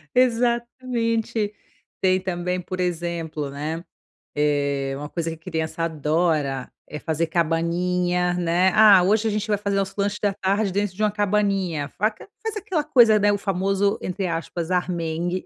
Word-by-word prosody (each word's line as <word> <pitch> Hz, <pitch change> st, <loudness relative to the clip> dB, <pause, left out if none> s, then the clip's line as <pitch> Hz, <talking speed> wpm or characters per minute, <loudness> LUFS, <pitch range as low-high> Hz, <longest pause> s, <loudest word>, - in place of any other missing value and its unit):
Exatamente. 235 Hz, -3 st, 0 dB, 0.5 s
Tem 185 Hz, -1 st, +3 dB
também, 180 Hz, -1 st, -2 dB
por 185 Hz, +1 st, -6 dB
exemplo, 170 Hz, -4 st, -2 dB
né, 155 Hz, +4 st, -4 dB, 0.5 s
eh, 140 Hz, -2 st, 0 dB
uma 145 Hz, +1 st, -6 dB
coisa 165 Hz, +1 st, -3 dB
que 165 Hz, -, -6 dB
criança 160 Hz, -1 st, -4 dB
adora 155 Hz, -3 st, 0 dB, 0.2 s
é 150 Hz, -, -6 dB
fazer 160 Hz, +1 st, -1 dB
cabaninha, 175 Hz, +2 st, 0 dB
né. 180 Hz, +1 st, +2 dB
"Ah, 210 Hz, -4 st, +8 dB
hoje 215 Hz, +3 st, +2 dB
a -, -, 0 dB
gente 210 Hz, 0 st, -2 dB
vai 205 Hz, -, +1 dB
fazer 200 Hz, -1 st, -1 dB
nosso 195 Hz, 0 st, -1 dB
lanche 205 Hz, +1 st, 0 dB
da 205 Hz, -1 st, +1 dB
tarde 195 Hz, +1 st, 0 dB
dentro 200 Hz, -1 st, -1 dB
de 215 Hz, -, -3 dB
uma 210 Hz, -, +3 dB
cabaninha", 195 Hz, -7 st, 0 dB
faca 215 Hz, -, -1 dB
faz 445 Hz, -1 st, -3 dB
aquela 375 Hz, -6 st, -1 dB
coisa, 240 Hz, -7 st, +5 dB
né, 205 Hz, 0 st, +3 dB
o 205 Hz, -, 0 dB
famoso, 195 Hz, +1 st, 0 dB
entre 185 Hz, +1 st, -2 dB
aspas, 170 Hz, 0 st, -3 dB
"armengue". 175 Hz, 0 st, -1 dB
180 Hz, 155 wpm, -23 LUFS, 165-205 Hz, 0.5 s, Ah